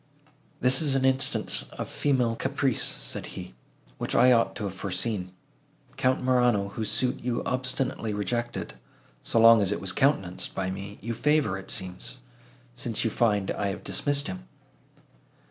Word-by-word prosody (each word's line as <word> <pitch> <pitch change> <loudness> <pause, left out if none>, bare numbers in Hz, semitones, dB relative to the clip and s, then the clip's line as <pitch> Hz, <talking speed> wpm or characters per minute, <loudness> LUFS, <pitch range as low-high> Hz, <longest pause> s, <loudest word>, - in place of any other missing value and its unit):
"This 130 +3 +4
is 145 -3 +1
an 135 -1 +2
instance 130 0 0
of - - -5
female 125 -5 +1
caprice," 135 0 0
said - - -2
he, - - -7 0.5
"which - - -2
I 125 - +6
ought 115 -2 +3
to - - -5
have 100 -2 -3
foreseen. 95 0 -2 0.6
Count 130 0 +1
Morano, 125 -6 +2
whose 110 +2 -3
suit 125 -1 +1
you 120 -1 -2
obstinately 125 -3 -1
rejected, 120 +4 -3 0.5
so 115 - +1
long 115 -1 +8
as 100 -1 +2
it 105 - -1
was 95 -1 0
countenanced 95 -10 0
by 95 -1 -1
me, 100 +2 -7
you 115 +4 -3
favour, 145 -2 +2
it 95 - -8
seems, 95 +7 -3 0.6
since 120 -2 -1
you 115 - 0
find 105 -5 +1
I 100 - -2
have 100 - -4
dismissed 145 -1 +1
him." 90 -10 -6
115 Hz, 160 wpm, -27 LUFS, 100-130 Hz, 0.6 s, long